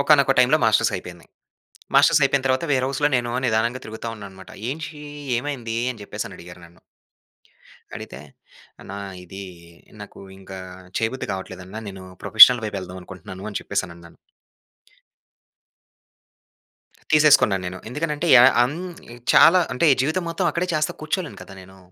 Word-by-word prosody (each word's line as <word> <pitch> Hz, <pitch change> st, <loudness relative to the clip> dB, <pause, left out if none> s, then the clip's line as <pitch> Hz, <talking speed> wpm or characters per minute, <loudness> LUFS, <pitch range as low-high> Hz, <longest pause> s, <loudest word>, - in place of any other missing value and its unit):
ఒకానొక 140 Hz, -2 st, +4 dB
టైమ్‌లో 125 Hz, +5 st, +5 dB
మాస్టర్స్ 110 Hz, 0 st, +3 dB
అయిపోయింది. 90 Hz, -2 st, -10 dB, 0.7 s
మాస్టర్స్ 150 Hz, +2 st, +5 dB
అయిపోయిన 135 Hz, -1 st, +1 dB
తర్వాత 130 Hz, +5 st, 0 dB
వేర్ 130 Hz, -1 st, +1 dB
హౌస్‌లో 140 Hz, +2 st, 0 dB
నేను 120 Hz, -1 st, -1 dB
నిదానంగా 115 Hz, +2 st, 0 dB
తిరుగుతా 110 Hz, +2 st, -7 dB
ఉన్నాన్నమాట. 95 Hz, -3 st, -12 dB, 0.2 s
"ఏంటి? 155 Hz, +1 st, -6 dB, 0.4 s
ఏమైంది?" 120 Hz, -4 st, -4 dB
అని 115 Hz, -4 st, -12 dB
చెప్పేసని -, -, -7 dB
అడిగారు 90 Hz, 0 st, -12 dB
నన్ను? 85 Hz, 0 st, -21 dB, 1.2 s
అడిగితే -, -, -9 dB, 0.6 s
అన్నా 100 Hz, -, -9 dB, 0.3 s
ఇది 95 Hz, +3 st, -9 dB, 0.6 s
నాకు -, -, -11 dB, 0.2 s
ఇంకా 95 Hz, 0 st, -10 dB, 0.4 s
చేయబుద్ధి 115 Hz, +4 st, -3 dB
కావట్లేదన్న. 95 Hz, +1 st, -8 dB
నేను 95 Hz, -1 st, -10 dB, 0.2 s
ప్రొఫెషనల్ 120 Hz, +2 st, +8 dB
వైపు 105 Hz, -, -5 dB
వెళ్దాం 95 Hz, 0 st, -8 dB
అనుకుంటున్నాను 95 Hz, +1 st, -10 dB
అని 105 Hz, -, -4 dB
చెప్పేసనన్నాను. 85 Hz, -4 st, -5 dB, 3.0 s
తీసేసుకున్నానేను. 100 Hz, -12 st, +4 dB
ఎందుకనంటే, 150 Hz, +4 st, -3 dB
యా 120 Hz, -, +8 dB, 0.2 s
హ్మ్. 130 Hz, +6 st, +1 dB, 0.6 s
చాలా 180 Hz, +2 st, +7 dB
అంటే 165 Hz, +6 st, +2 dB, 0.2 s
జీవితం 160 Hz, +6 st, -1 dB
మొత్తం 175 Hz, +2 st, -1 dB
అక్కడే 175 Hz, +3 st, -2 dB
చేస్తా 155 Hz, 0 st, -1 dB
కూర్చోలేను 165 Hz, +2 st, -3 dB
కదా! 95 Hz, -, -12 dB
నేను. 95 Hz, +1 st, -16 dB
115 Hz, 125 wpm, -22 LUFS, 95-145 Hz, 3.0 s, ప్రొఫెషనల్